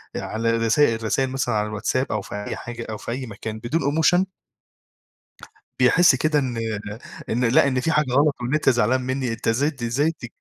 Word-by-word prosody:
آآ - - -2
على 115 +1 -2
الرسا 115 +2 +3
الرسايل 115 +4 -1
مثلًا 135 -4 -1
على 105 0 0
الواتساب 110 +5 -2
أو 105 - -1
في 100 - -8
أي - - -3
حاجة 120 0 -7
أو 110 - -4
في 115 - -6
أي 130 +1 -4
مكان 110 0 -7
بدون 140 +9 -1
emotion 160 +5 +3 1.6
بيحس 145 +5 +5
كده 150 +3 +1
إن 125 -4 -2 0.7
إن 120 +3 0
لأ، 125 +4 +4
إن 130 -1 0
في 160 +5 0
حاجة 150 -3 +2
غلط 145 +2 +3
وإن 125 +5 -1
أنت 150 -3 +3
زعلان 120 +2 +2
منّي، 130 -1 -2
أنت 115 0 -4
إزاي 140 +7 +2
د 135 -5 -13
إزاي 135 +7 +1
تك 125 -7 -10
125 Hz, 200 wpm, -23 LUFS, 115-145 Hz, 1.6 s, بيحس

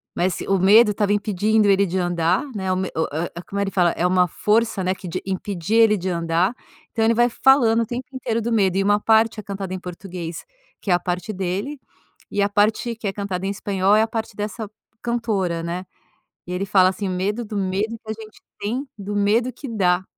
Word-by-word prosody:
mas 180 0 0
o 195 - +1
medo 210 +4 +6
estava 205 0 +1
impedindo 210 +1 +2
ele 200 0 +4
de 185 +1 -2
andar, 175 - +1
né, 190 -2 -2
o - - +2
me 185 0 -2
o 160 - +1
o 170 +3 -4
como 200 - -4
ele 195 -1 -1
fala, 175 -3 +3
é 175 - -1
uma 180 0 +3
força, 215 +2 +1
né, 185 +1 +1
que 185 - -9
de 180 +2 -4
impedia 195 +3 +1
ele 210 -2 +4
de 185 +1 -3
andar. 170 +4 +1 0.4
Então 225 - 0
ele 230 - +4
vai 240 +1 +3
falando 235 -3 +4
o - - 0
tempo 245 +3 -5
inteiro 235 -3 -2
do 235 - -2
medo 195 -5 +2
e 195 - +2
uma 205 +1 +3
parte 220 +1 +3
é 215 - -7
cantada 195 -1 -5
em 185 - -4
português, 180 -2 -7 0.4
que 195 - -2
é - - +6
a 175 - +3
parte 180 +5 -3
dele, 195 +10 -3 0.5
e 205 - 0
a 200 - +2
parte 215 +3 +1
que 220 -2 -5
é 195 - -2
cantada 195 -2 -3
em - - 0
espanhol 200 0 +1
é 215 - +5
a 225 - +2
parte 225 -2 -4
dessa 210 +1 -4 0.3
cantora, 210 -8 -1
né. 175 +2 -4 0.6
E - - -6
ele 190 +2 -1
fala 190 -2 +5
assim: 190 +1 -3
"O - - -2
medo 205 +6 -1
do 210 - -7
medo 200 +4 -1
que 220 - -12
a - - -1
gente 220 0 -13 0.2
tem 245 +7 -2
do 205 +1 -5
medo 220 +5 +2
que 275 - -8
dá", 185 -4 +2
200 Hz, 230 wpm, -22 LUFS, 185-220 Hz, 0.6 s, medo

